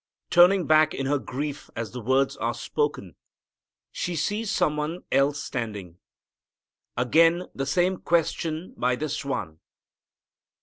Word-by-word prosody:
Turning 180 +1 +6
back 155 0 +4
in 135 - -3
her 145 +1 +1
grief 145 +3 -5
as 115 -1 -4
the 125 - -6
words 130 +4 +1
are 115 0 -2
spoken, 120 - -2 0.8
she 175 - -3
sees 205 +8 -1
some 150 - +1
one 150 +4 -3
else 140 +1 +2
standing. 105 -8 -5 1.0
Again 165 +8 +4
the 135 0 -3
same 180 +6 +1
question 165 0 -1
by 125 0 +1
this 155 +3 -3
One. 80 - -4
145 Hz, 130 wpm, -25 LUFS, 125-165 Hz, 1.0 s, Turning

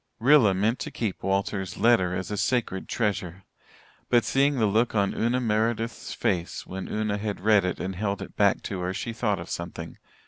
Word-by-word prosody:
Rilla 120 -5 +5
meant 110 +6 +1
to - - -4
keep 110 -6 -3
Walter's 95 -1 -1
letter 95 -7 +3
as 95 +2 -4
a - - -1
a - - -2
sacred 110 -5 -1
treasure. 100 -5 -2 0.7
But, 120 -2 +4
seeing 140 +1 +2
the 110 - +3
look 110 +3 +1
on 100 -1 +2
Una 120 +3 +1
Meredith's 115 0 -1
face 85 -1 -2
when 95 0 -6
Una 105 -1 -1
had 105 -1 -3
read 105 0 +4
it 90 - -2
and 95 +1 -3
held 100 +1 -2
it - - -12
back 100 0 +3
to 95 - -4
her, 90 +1 -2
she 115 - -4
thought 105 -3 0
of 85 - -7
something. 85 -1 -6
105 Hz, 200 wpm, -26 LUFS, 95-115 Hz, 0.7 s, Rilla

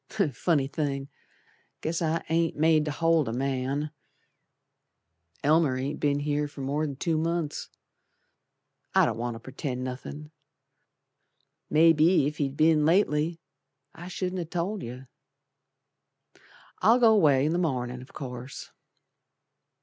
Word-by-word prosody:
Funny 155 -6 +1
thing! 140 -1 -3 0.7
Guess 165 +2 -2
I 165 0 0
ain't 165 0 +1
made 155 0 +3
to 150 - -2
hold 165 -2 +2
a - - -2
man. 135 +3 -2 1.5
Elmer 150 -3 +3
ain't 135 +3 -3
be'n 145 -1 +1
here 150 0 0
for 145 -1 -10
mor'n 140 +1 -2
two 160 +3 0
months. 165 -2 -2 1.3
I - - +6
don't - - -2
want 120 0 -3
to - - -8
pretend 130 +1 -5
nothin', 145 +4 -7 1.4
Mebbe 160 0 +5 0.3
if 150 0 -4
he'd 140 -1 -2
be'n 155 -1 +4
lately 165 -1 +2 0.5
I 175 - -10
shouldn't 185 0 -3
have 165 -2 -5
told 180 +4 -2
yer. 125 +3 -8 1.7
I'll 230 +3 +6
go 230 -3 +6
away 145 -9 +4
in 155 - +1
the 175 - +1
mornin', 125 -7 -2
o' - - -10
course. 125 -2 -8
150 Hz, 125 wpm, -27 LUFS, 135-165 Hz, 1.7 s, I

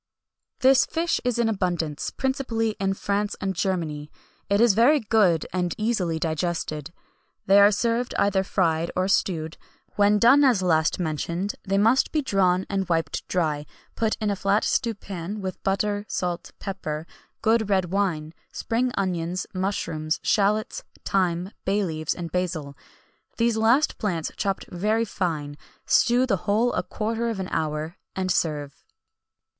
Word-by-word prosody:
"This 265 0 +5
fish 335 +1 0
is 245 -1 0
in 235 -1 +2
abundance, 175 -7 -1
principally 260 -5 -1
in 195 0 0
France 205 +1 -1
and 195 0 -2
Germany; 165 -5 -2 0.4
it 200 0 +3
is 235 -2 +5
very 250 +9 +5
good, 205 - +2
and 180 -2 -1
easily 210 -7 0
digested. 160 -1 -2 0.5
They 195 +1 +6
are 200 0 +8
served 235 +3 0
either 195 -1 +2
fried 170 -4 0
or 185 +1 +1
stewed; 165 -5 0 0.4
when 205 0 +4
done 260 +7 +6
as 240 -9 +4
last 160 -3 +2
mentioned, 170 +4 -2
they 195 0 +1
must 225 +6 +3
be 305 -2 0
drawn 190 -6 +2
and 195 -2 -2
wiped 165 -1 -1
dry, 150 -5 -1 0.3
put 220 -1 0
in 210 -1 0
a - - 0
flat 195 +2 +1
stewpan 205 -4 -2
with 190 -2 -5
butter, 205 +1 0
salt, 180 -2 -3
pepper, 160 -6 -5 0.4
good 220 -1 +2
red 190 -3 +1
wine, 170 -6 -1 0.2
spring 245 +2 -1
onions, 180 -2 -1
mushrooms, 170 -5 -2
shalots, 210 +1 +1 0.2
thyme, 180 -1 0
bay 200 +2 +1
leaves 155 -3 -2
and 170 -2 -6
basil 165 -6 -2 0.6
these 230 -1 +2
last 230 +7 +3
plants 175 -7 -2
chopped 195 -1 -2
very 215 +6 +1
fine; 155 -8 -3 0.3
stew 245 +2 +4
the 210 -7 +1
whole 225 +4 +2
a - - 0
quarter 230 +2 -2
of 220 -4 -3
an 185 - -4
hour, 155 +2 -2 0.2
and 185 -1 -1
serve." 150 -5 -2
195 Hz, 150 wpm, -25 LUFS, 170-220 Hz, 0.6 s, are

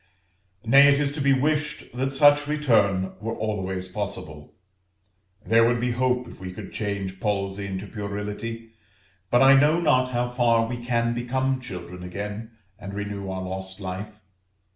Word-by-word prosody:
Nay, 140 +4 +7
it 140 - +3
is 140 -1 0
to 145 0 -4
be 140 0 +3
wished 150 -2 -1
that 135 +2 -1
such 145 +1 +5
return 105 -11 +2
were 115 +2 -4
always 95 -4 -3
possible. 90 -6 -6 0.9
There 115 +1 +5
would 120 +1 +2
be 125 +1 0
hope 125 0 0
if - - -12
we 95 -1 -6
could 100 0 -9
change 100 -3 -3
palsy 100 -1 -2
into 95 +1 -5
puerility; 105 +3 -5 0.6
but 120 +2 +4
I 135 +1 +8
know 150 +4 +5
not 130 -6 +3
how 120 -1 0
far 120 -2 +2
we 120 +1 -4
can 120 -1 0
become 130 +2 -1
children 90 -5 -8
again, 105 +5 -6 0.3
and 100 -1 -7
renew 100 -1 -4
our 95 0 -4
lost 95 +1 -6
life. 100 +3 -6
115 Hz, 160 wpm, -25 LUFS, 100-130 Hz, 0.9 s, I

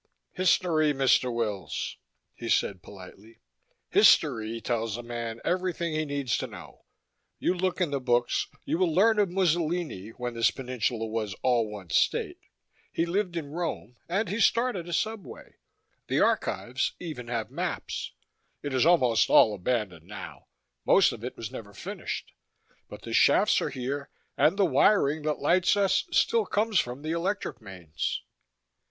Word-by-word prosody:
"History, 165 -4 +2
Mr. 130 -2 +3
Wills," 105 - -3 0.4
he - - -7
said 95 -3 +1
politely. 100 +4 -14 0.5
"History 110 +1 +4
tells 115 -2 -2
a 120 - -7
man 115 -1 -5
everything 180 -2 -1
he 155 0 -1
needs 140 -4 -1
to - - -3
know. - - -13 0.5
You - - +1
look 185 +1 -1
in 175 -5 0
the 140 - 0
books, 120 -1 +1
and - - -28
you 165 - -1
will 180 -3 +2
learn 210 +6 +4
of 200 -3 +3
Mussolini, 170 - 0
when 120 +1 -5
this 115 -1 +3
peninsula 125 -3 -2
was 110 -3 -3
all 120 -4 +2
one 100 -5 -9
state; - - +1 0.5
he 165 - 0
lived 180 0 -1
in 145 -4 -5
Rome, 160 - -4
and 200 +5 0
he 205 +5 -3
started 230 -7 +1
a - - -4
subway. 220 +3 -4 0.5
The - - +1
archives 130 +3 0
even 150 -9 -7
have 115 -2 -3
maps. - - -4 0.5
It 145 -2 -3
is 130 +4 +3
almost 125 -10 +4
all 110 -5 +6
abandoned 95 -5 -2
now. 105 +1 -9 0.4
Most - - +5
of - - -9
it - - -6
was - - -6
never - - -9
finished. - - -6 0.6
But - - -10
the - - -6
shafts - - +4
are - - -1
here, 140 +2 -4 0.3
and 165 +6 +3
the 200 - +4
wiring 155 0 +3
that 150 -1 0
lights 180 +6 +3
us 195 -2 +2
still 460 -2 +2
comes 210 -2 +1
from 125 +4 -3
the 155 - -3
electric 170 - -2
mains." 90 -7 -5
140 Hz, 160 wpm, -27 LUFS, 115-175 Hz, 0.6 s, all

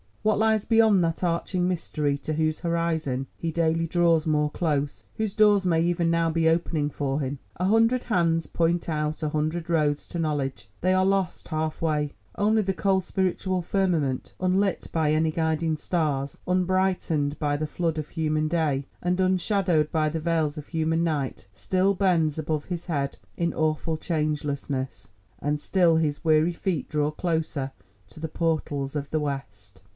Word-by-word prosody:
What 215 -1 +2
lies 220 -1 +2
beyond 220 -5 +4
that 165 +2 -1
arching 175 +1 0
mystery 155 -5 -1
to 155 - -3
whose 155 0 0
horizon 165 -6 -1
he 165 - -2
daily 165 0 +1
draws 165 -1 +3
more 150 -1 +2
close—whose 160 +7 -2
doors 210 -2 +4
may 165 -2 +3
even 170 0 +1
now 165 0 +2
be 165 0 +1
opening 160 -3 +1
for 140 0 -1
him? 140 0 -3 0.2
A 180 - 0
hundred 225 +5 +3
hands 165 -6 +1
point 170 +1 0
out 150 -1 -2
a 155 - +1
hundred 155 +3 -2
roads 150 -3 +1
to 170 - -4
knowledge—they 145 - -1
are 185 0 +3
lost 195 -2 0
half 155 -1 -2
way. 150 -2 0 0.2
Only 215 +1 +3
the 195 -1 -1
cold 190 0 +1
spiritual 185 0 -1
firmament, 165 -9 0
unlit 190 +2 +1
by 160 -2 +1
any 155 +1 +2
guiding 160 0 0
stars, 150 -4 -1
unbrightened 180 -5 +1
by 145 -1 0
the 155 +1 -2
flood 165 0 -1
of 155 -1 -4
human 155 -2 0
day, 155 -4 0 0.2
and 180 +1 0
unshadowed 185 -4 +2
by 155 -1 +2
the 160 +1 -3
veils 160 -2 0
of 150 - -7
human 160 0 0
night, 145 -10 -2
still 185 - +1
bends 170 -6 +2
above 155 -1 -2
his 175 -1 -5
head 140 -5 -2 0.2
in 170 -1 0
awful 155 +1 0
changelessness, 145 -4 -2 0.3
and 145 +5 -1
still 175 +1 +3
his 150 -3 0
weary 160 +2 +4
feet 170 -4 -2
draw 150 -1 +1
closer 155 -4 -2 0.4
to - - -14
the 160 - -3
portals 155 -4 -1
of 145 -1 -3
the 155 - 0
West. 120 -9 -6
160 Hz, 165 wpm, -26 LUFS, 150-180 Hz, 0.4 s, beyond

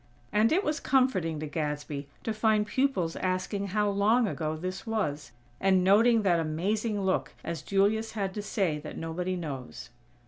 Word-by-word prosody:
And 215 +2 +3
it 370 +5 +3
was 300 0 -1
comforting 195 - +1
to - - -2
Gadsby 150 -2 -3 0.2
to 225 - -1
find 215 -1 +2
pupils 210 -9 0
asking 185 +2 -1
how 210 +2 +1
long 210 +4 +3
ago 155 -5 -2
this 185 +6 -5
was, 175 - -2 0.3
and 190 -1 +3
noting 220 +4 +5
that 175 -4 +3
amazing 200 +7 -1
look 190 -1 0
as 170 -1 -4
Julius 210 +3 +1
had 195 -3 -2
to 210 - -4
say 190 -7 -1
that 150 0 -8
nobody 175 +3 -3
knows. 140 -9 -6
195 Hz, 165 wpm, -29 LUFS, 165-215 Hz, 0.3 s, noting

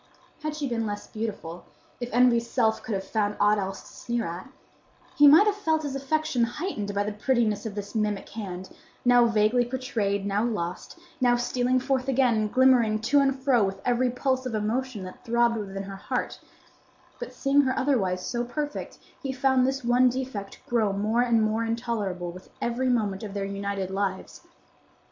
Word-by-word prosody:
Had 305 -1 -3
she 295 -2 -2
been 230 -3 -1
less 205 0 -5
beautiful,—if 215 +2 -7
Envy's 235 -1 +3
self 220 -3 +1
could 220 - -3
have 190 - -3
found 205 +1 -1
aught 210 0 +4
else 195 0 -4
to - - -15
sneer 235 -2 -2
at,—he 260 +9 -2
might 315 +8 +8
have 420 - +3
felt 320 -6 0
his 280 -2 -3
affection 275 -2 0
heightened 235 - -3
by 200 - +2
the 210 0 -3
prettiness 220 -2 0
of 205 - -7
this 205 -1 -6
mimic 210 -3 -1
hand, 190 -4 -7 0.3
now 245 -1 +6
vaguely 225 +2 +3
portrayed, 230 -6 -2
now 200 +1 0
lost, 185 - -3 0.2
now 245 -1 +4
stealing 245 +1 +1
forth 265 0 -1
again 260 -2 +3
and 215 -1 0
glimmering 250 -4 +4
to 245 +6 +3
and 270 -1 +1
fro 255 -5 +4
with 195 0 -2
every 250 +1 +2
pulse 260 +1 -1
of 235 - -3
emotion 220 +1 -2
that 185 - -10
throbbed 235 -1 +2
within 195 -2 -5
her 195 0 -8
heart; - - -3 0.8
but 485 - -6
seeing 280 +1 +3
her 260 -2 -1
otherwise 190 -10 +1
so 240 -1 -2
perfect, 295 +5 -5 0.2
he 270 - -3
found 265 -1 +2
this 270 0 -2
one 245 +1 +4
defect 245 -6 -5
grow 225 -4 +1
more 215 +4 +1
and 235 -2 +3
more 215 +1 0
intolerable 220 -6 -2
with 185 +1 -13
every 245 +2 -1
moment 210 -6 0
of 205 -2 -7
their 200 -1 -2
united 200 -1 -3
lives. 195 -1 -3
235 Hz, 180 wpm, -26 LUFS, 205-255 Hz, 0.8 s, might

